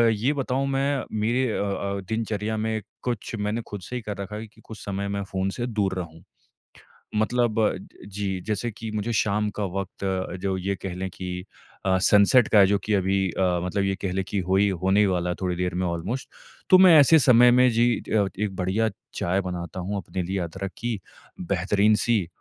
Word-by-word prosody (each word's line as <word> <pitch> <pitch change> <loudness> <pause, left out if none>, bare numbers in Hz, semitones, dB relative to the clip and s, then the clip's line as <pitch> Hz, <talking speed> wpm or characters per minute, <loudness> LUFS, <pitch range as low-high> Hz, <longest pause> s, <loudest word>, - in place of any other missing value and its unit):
ये 125 +8 +1
बताऊँ 135 -1 -1
मैं 135 +1 0 0.2
मेरे 120 +5 +1
अ - - -1
अ, 100 0 -2
दिनचर्या 110 -1 -2
में 110 0 -1 0.2
कुछ 120 -2 -3
मैंने 105 +3 -1
खुद 105 -2 -7
से 125 +8 -7
ही 125 - -3
कर 105 -1 -6
रखा 100 +1 -6
है 110 +1 -6
कि 105 - -22
कुछ 110 - -10
समय 100 0 -3
मैं 100 0 -2
फ़ोन 95 0 -1
से 120 - -1
दूर 105 -5 0
रहूँ। 80 -2 -8 0.9
मतलब 120 +1 +1 0.5
जी, 100 -1 -3
जैसे 110 +2 -1
कि 110 +1 -7
मुझे 105 +2 -2
शाम 105 0 +1
का - - 0 0.2
वक़्त 100 0 -7 0.4
जो 95 -1 -1
ये 100 +2 -2
कह 90 -2 -5
लें 95 +1 -3
कि 90 0 -6 0.4
अ, 95 -1 +3
सनसेट 105 +4 +5
का 105 - +5
है 95 - +7
जो 100 - +2
कि 105 - 0
अभी 95 -1 +1
अ, 90 -2 +1
मतलब 100 +2 -1
ये 95 0 0
कह 95 - -2
लें 95 0 -1
कि 100 - -1
होई 100 +2 +4
होने 95 +2 +3
ही 105 - +5
वाला 90 -2 0
है 90 - -1
थोड़ी 90 -1 -1
देर 90 0 -2
में 90 +1 0
ऑलमोस्ट 90 +10 -3 0.4
तो 185 - +9
मैं 185 -3 +8
ऐसे 155 +3 +7
समय 125 -2 +6
में 125 +1 +5
जी 115 +1 +3
अ, 105 -3 0
एक 105 -2 -2
बढ़िया 95 +5 0 0.3
चाय 95 +3 0
बनाता 90 0 -5
हूँ 100 +3 -3
अपने 95 -2 -4
लिए 95 +2 -2
अदरक 95 +3 -4
की 120 -3 -3 0.4
बेहतरीन-सी, 100 +3 +2
100 Hz, 205 wpm, -25 LUFS, 95-110 Hz, 0.9 s, तो